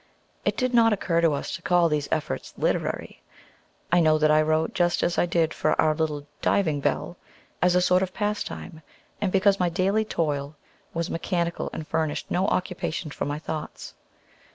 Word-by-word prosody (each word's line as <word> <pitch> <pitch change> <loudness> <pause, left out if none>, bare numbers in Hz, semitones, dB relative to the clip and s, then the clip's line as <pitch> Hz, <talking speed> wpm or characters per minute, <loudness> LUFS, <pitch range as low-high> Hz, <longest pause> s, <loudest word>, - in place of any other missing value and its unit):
It - - 0
did 255 -1 0
not 230 -1 +5
occur 170 -4 0
to 165 -3 +3
us 140 - -3
to - - -9
call 175 -1 +3
these 150 -2 -1
efforts 155 -2 -3
"literary." - - -2 0.7
I 175 - +5
know 155 -2 +4
that 155 0 +3
I 155 0 +5
wrote 155 +1 +1
just 175 -1 +1
as 175 - +1
I - - +2
did 165 -2 +1
for - - 0
our 155 -1 +4
little 150 -2 -2 0.2
"Diving 160 -7 +2
Bell," 175 +5 -2 0.4
as 180 0 +4
a 180 - +4
sort 180 +1 +3
of 190 -1 -1
pastime, 205 -5 -4 0.4
and 200 -3 0
because 195 +1 +3
my 180 -1 +2
daily 195 +5 +1
toil 150 -7 -2 0.4
was 170 +1 -3
mechanical, 170 0 -2
and 155 -1 -6
furnished 160 -2 -2
no 185 +2 +1
occupation 175 -3 -2
for - - -3
my 145 +1 -2
thoughts. 155 0 -6
170 Hz, 180 wpm, -25 LUFS, 155-185 Hz, 0.7 s, not